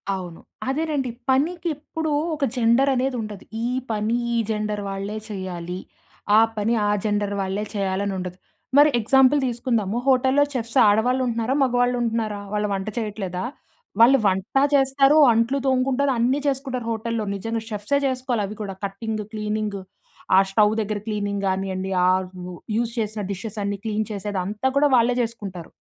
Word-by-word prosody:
అవును. 175 -3 -7 0.3
అదేనండి. 290 -2 -1 0.2
పనికి 325 +7 +1
ఎప్పుడూ, 315 +1 -4 0.2
ఒక 295 - -4
జెండర్ 240 +3 +3
అనేది 255 +1 0
ఉండదు. 210 -3 -7 0.2
ఈ - - 0 0.3
పని 215 +2 0 0.2
ఈ - - +1
జెండర్ 210 -1 -2
వాళ్ళే 195 +2 -4
చేయాలి. 180 -3 -5 0.6
ఆ - - +8 0.2
పని 215 +3 +1
ఆ - - +2
జెండర్ 205 -1 0
వాళ్ళే 195 +2 -2
చేయాలని 195 0 -1
ఉండదు. 180 0 -5 0.4
మరి 295 +1 +8
ఎగ్జాంపుల్ 265 +5 +4
తీసుకుందాము. 235 -3 -1
హోటల్లో 265 +2 +4
చెఫ్స్ 235 0 -3
ఆడవాళ్ళు 245 +5 +3
ఉంటున్నారా? 230 +1 -1
మగవాళ్ళు 245 -1 +2
ఉంటున్నారా? 225 -3 -1
వాళ్ళు 210 0 0
వంట 195 +1 -3
చేయట్లేదా? 205 -5 -3 0.6
వాళ్ళు 265 +4 +8
వంటా 190 +8 +1
చేస్తారు, 275 +2 +4 0.2
అంట్లు 230 +4 +1
తోముకుంటారు, 265 +1 +2
అన్నీ 255 +4 +2
చేసుకుంటారు 265 -3 -2
హోటల్లో. 230 0 -2
నిజంగా 225 +3 -3
చెఫ్సే 210 +7 0
చేసుకోవాలి 255 -4 -1
అవి 205 +2 -8
కూడ. 205 - -4 0.2
కట్టింగు, 215 +2 -4
క్లీనింగు 210 -2 -2 0.6
ఆ - - +9
స్టవ్ 210 +1 +4
దగ్గర 210 0 -2
క్లీనింగ్ 205 -2 -2
కానియండి. 190 0 -2
ఆ - - +4 0.7
యూజ్ 230 0 -1
చేసిన 215 0 -2
డిషెస్ 215 +2 -6
అన్నీ 200 0 -2
క్లీన్ 215 0 -1
చేసేది 205 -1 -3
అంతా 210 +7 -1
కూడా 290 +1 +4
వాళ్ళే 240 0 +4
చేసుకుంటారు. 200 -7 -6
220 Hz, 150 wpm, -23 LUFS, 205-255 Hz, 0.7 s, ఆ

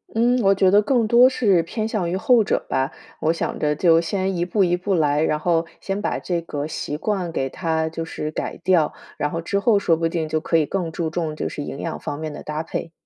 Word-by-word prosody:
嗯， 245 +2 +3
我 195 -1 +4
觉 190 -1 +4
得 205 +1 +6
更 235 +1 +2
多 240 +3 +6
是 200 -9 +3
偏 215 +6 -3
向 195 -6 -1
于 185 - -1
后 235 +2 +4
者 - - -1
吧， 135 +3 0 0.3
我 160 - +2
想 165 - -3
着 150 0 +1
就 165 +1 +4
先 190 +2 -1
一 170 - 0
步 195 +3 +1
一 175 -1 +2
步 185 +2 -1
来， 150 -2 +2
然 155 -1 +1
后， 165 0 +1
先 195 +1 -3
把 - - -1
这 175 -2 -2
个 145 -3 -4
习 150 -1 -4
惯 185 -1 -2
给 135 - -1
它 160 +2 -1
就 165 0 -5
是 155 -1 -5
改 - - -4
掉， 170 -5 +3 0.3
然 145 - 0
后， 165 - -3
之 200 +4 -1
后 210 0 +3
说 170 -4 +2
不 165 0 +1
定 165 -1 -2
就 155 0 0
可 165 +1 +1
以 155 - +2
更 175 -2 -2
注 160 -1 -3
重 160 -3 -2
就 - - -3
是 145 - -5
营 140 - -6
养 165 - -4
方 145 - -5
面 155 -1 -5
的 - - -8
搭 155 +1 -4
配。 165 0 -5
170 Hz, 270 characters per minute, -22 LUFS, 160-195 Hz, 0.3 s, 得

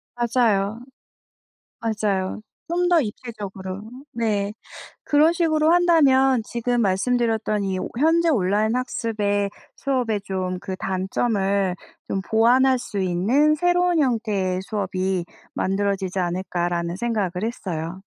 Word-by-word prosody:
맞아요. 230 -3 +1 1.0
맞아요. 210 -4 -1 0.3
좀 355 +1 +1
더 350 -2 +5
입체적으로. 205 -5 -6 0.3
네. 210 -4 -1 0.5
그런 305 +3 +4
식으로 315 -1 +2
한다면 270 -8 +4
지금 240 0 -1
말씀드렸던 220 +1 +1
이 190 -1 -1 0.2
'현재 330 +3 +3
온라인 210 -1 +1
학습의 210 -5 -1 0.3
수업의 245 -7 -1
좀 185 -1 -3
그 190 - -5
단점을 195 0 0 0.3
좀 195 - -1
보완할 250 +5 +4
수 225 -5 -6
있는 215 +13 +2
새로운 355 +1 +2
형태의 210 -8 0
수업이 190 -3 -2 0.3
만들어지지 195 -1 -1
않을까?'라는 175 -1 -2
생각을 215 -5 -1
했어요. 180 -6 -4
215 Hz, 260 characters per minute, -23 LUFS, 190-255 Hz, 1.0 s, 더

